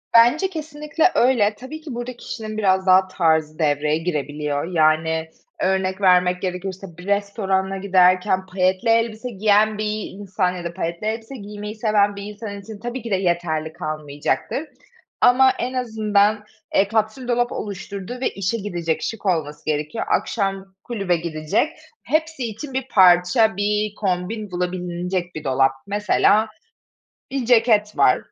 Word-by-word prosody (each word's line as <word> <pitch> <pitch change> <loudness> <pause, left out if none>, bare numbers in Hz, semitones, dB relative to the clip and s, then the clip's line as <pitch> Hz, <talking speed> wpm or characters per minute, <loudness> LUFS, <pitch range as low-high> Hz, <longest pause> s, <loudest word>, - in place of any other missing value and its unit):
Bence 245 +11 +5
kesinlikle 310 +1 -1
öyle, 230 -4 +3
tabii 300 +7 -9
ki 295 -6 -7
burada 240 +1 -5
kişinin 215 -2 -6
biraz 190 -2 +2
daha 185 0 +5
tarzı 160 -4 +1
devreye 150 0 +1
girebiliyor. 150 -3 -2
Yani 160 -1 +1 0.3
örnek 190 0 0
vermek 180 -1 +4
gerekirse, 185 -1 -5
bir 180 - -11
restorana 195 -1 0
giderken 185 0 +3
payetli 185 +4 0
elbise 230 +1 +1
giyen 215 0 +3
bir 215 0 -2
insan 190 -2 -1
ya 175 - -6
da 170 0 -5
payetli 170 +3 -3
elbise 225 +4 -4
giymeyi 210 -1 -7
seven 210 -2 +2
bir 200 - -7
insan 205 -1 -7
için 215 0 -10
tabii 240 +3 -5
ki 230 -2 -7
de - - +4
yeterli 170 -4 -1
kalmayacaktır. 155 - -3 0.6
Ama 260 +1 +6
en 250 +2 -2
azından, 215 -3 +1 0.3
eee, 195 - +4
kapsül 220 +3 -1
dolap 240 0 +1
oluşturdu 200 +2 -6
ve - - +1
işe 195 +4 -2
gidecek, 175 -6 -2
şık 225 -2 -5
olması 155 -5 -1
gerekiyor. 150 +8 -2
Akşam 195 -2 -1
kulübe 200 -7 -1
gidecek. 160 - -1 0.3
Hepsi 315 -1 -1
için 235 +5 -6
bir 265 0 -2
parça, 185 +3 +5
bir 210 +1 0
kombin 195 +2 -2
bulabilinecek 180 0 -3
bir 155 - -6
dolap. 135 -1 +3 0.2
Mesela 210 +1 +3 0.8
bir 265 -3 -2
ceket 220 - +3
var. 130 -2 +5
200 Hz, 140 wpm, -22 LUFS, 180-220 Hz, 0.8 s, Ama